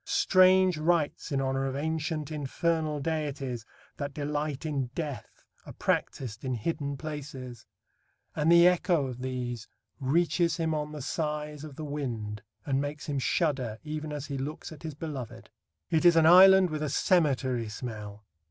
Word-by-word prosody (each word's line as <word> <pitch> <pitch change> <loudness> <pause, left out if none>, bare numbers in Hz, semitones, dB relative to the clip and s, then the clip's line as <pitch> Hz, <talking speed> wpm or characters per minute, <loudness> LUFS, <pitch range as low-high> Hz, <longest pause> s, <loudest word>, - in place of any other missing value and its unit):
Strange 185 -2 +4
rites 160 -1 0
in 140 - +1
honour 135 0 0
of 135 - -3
ancient 155 0 -2
infernal 155 +1 -1
deities 140 -6 -3 0.3
that 140 -1 -5
delight 150 0 -3
in 140 -4 -1
death 145 -9 -6 0.2
are - - -8
practised 115 -4 -2
in 130 -2 -1
hidden 140 +3 -3
places, 135 -4 -7 0.7
and 155 +2 +2
the 170 0 +8
echo 180 -4 +2
of 125 -2 -6
these 125 -3 -4 0.3
reaches 170 +5 +1
him 160 -1 0
on 150 -1 -2
the 150 -3 -6
sighs 150 -1 -3
of 150 -3 -9
the 155 - -6
wind 115 -8 -4 0.2
and 135 -1 +1
makes 145 +1 -5
him 145 -2 -2
shudder 130 -7 0
even 155 0 -5
as 145 -1 -4
he 140 -2 -4
looks 150 +5 -5
at 155 - -11
his 155 -3 -6
beloved. 125 -8 -7 0.4
It 160 -1 +2
is 175 -1 +7
an 165 -1 +5
island 185 +1 +8
with 155 -1 -3
a 150 - -1
cemetery 130 - +1
smell. 105 -2 -7
150 Hz, 160 wpm, -29 LUFS, 130-160 Hz, 0.7 s, the